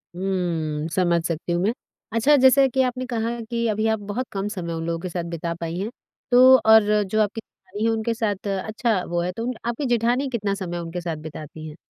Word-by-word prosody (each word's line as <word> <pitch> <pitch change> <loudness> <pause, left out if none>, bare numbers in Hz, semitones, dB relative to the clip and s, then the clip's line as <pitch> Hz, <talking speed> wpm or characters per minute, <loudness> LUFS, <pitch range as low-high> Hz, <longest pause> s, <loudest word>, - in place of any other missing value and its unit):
हुँ, 170 -5 -2
समझ 175 -2 +2
सकती 165 +1 -3
हूँ 175 - 0
मैं। 210 - +2 0.4
अच्छा, 230 +6 +4
जैसे 265 0 +6
कि 265 +1 +1
आपने 255 0 -2
कहा 235 -1 -2
कि 235 -1 0
अभी 215 +1 0
आप 220 -1 +1
बहुत 255 +4 -3
कम 195 0 -2
समय 180 -5 -4
उन 165 0 -4
लोगों 165 0 -2
के 185 +1 -5
साथ 175 0 -3
बिता 170 0 -3
पाई 165 0 -3
हैं, 205 +3 -2 0.4
तो 255 +1 +8
और 220 0 +8 0.2
जो 215 +3 0
आपकी 210 +2 -1
जेठानी 200 0 -9
है - - +3
उनके 225 +1 -1
साथ 210 -3 -2
अच्छा 215 0 -1
वो 175 0 0
है 180 +1 -1
तो 230 +5 -5
उन 250 - -1
आपकी 235 +4 -2
जेठानी 245 +2 +1
कितना 210 -5 -1
समय 180 -3 -4
उनके 170 +1 -5
साथ 170 -2 -3
बिताती 155 0 -9
हैं? 150 - -9
205 Hz, 220 wpm, -23 LUFS, 170-235 Hz, 0.4 s, तो